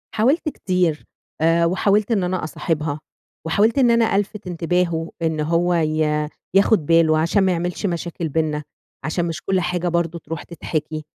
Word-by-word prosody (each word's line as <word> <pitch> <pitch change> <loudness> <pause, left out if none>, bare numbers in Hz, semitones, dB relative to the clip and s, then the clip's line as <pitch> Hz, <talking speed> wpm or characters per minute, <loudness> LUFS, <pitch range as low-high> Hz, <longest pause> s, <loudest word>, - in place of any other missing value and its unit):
حاولت 270 +9 +2
كتير 180 - -1 0.4
آآ، 165 +1 +4
وحاولت 200 +5 +2
إن 200 -5 +2
أنا 180 -1 -1
أصاحبها، 155 -2 -2 0.5
وحاولت 210 +9 +2
إن 250 -3 +5
أنا 230 -3 +3
ألفِت 205 0 -2
انتباهُه، 170 -1 -1
إن 160 -1 0
هو 170 +3 +1
ي 155 -2 +1 0.3
ياخد 195 -4 +4
باله 160 -1 +4
عشان 170 +5 +2
ما 190 - +3
يعملش 175 +3 -2
مشاكل 170 -2 -3
بيننا، 150 0 -1 0.4
عشان 170 +2 -1
مش 165 0 -4
كُلّ 190 0 0
حاجة 180 0 -1
برضه 170 0 -1
تروح 165 -1 -6
تتحكي. 155 -2 -4
170 Hz, 155 wpm, -21 LUFS, 160-185 Hz, 0.5 s, إن